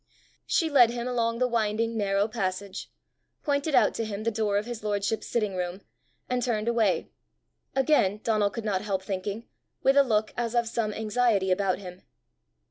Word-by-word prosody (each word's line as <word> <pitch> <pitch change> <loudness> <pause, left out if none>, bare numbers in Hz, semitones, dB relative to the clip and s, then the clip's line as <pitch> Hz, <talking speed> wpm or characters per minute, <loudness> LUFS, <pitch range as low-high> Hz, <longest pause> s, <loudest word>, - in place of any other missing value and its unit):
She 330 - +2
led 265 -6 +6
him 240 +1 -3
along 230 -2 0
the 255 +1 +2
winding 230 -1 0
narrow 200 -1 +1
passage, 200 -3 -4 0.5
pointed 285 0 0
out - - +4
to 230 - -2
him 215 -1 -4
the 230 - +1
door 210 -2 0
of 205 - -1
his 240 -3 -6
lordship's 205 +1 -1
sitting 210 -5 -1
room, 180 +1 -3 0.5
and 250 0 0
turned 230 -3 -1
away 225 -5 +1 0.6
again, 265 -8 +3
Donal 215 -3 +2
could 225 +2 -6
not 195 -3 0
help 195 -2 -2
thinking, 200 +4 -4 0.4
with 270 - +4
a 280 - +8
look 215 -4 0
as 240 0 -2
of 235 -1 +2
some 225 -2 -1
anxiety 215 -3 +1
about 185 0 +1
him. 180 -1 -10
215 Hz, 175 wpm, -27 LUFS, 200-235 Hz, 0.6 s, a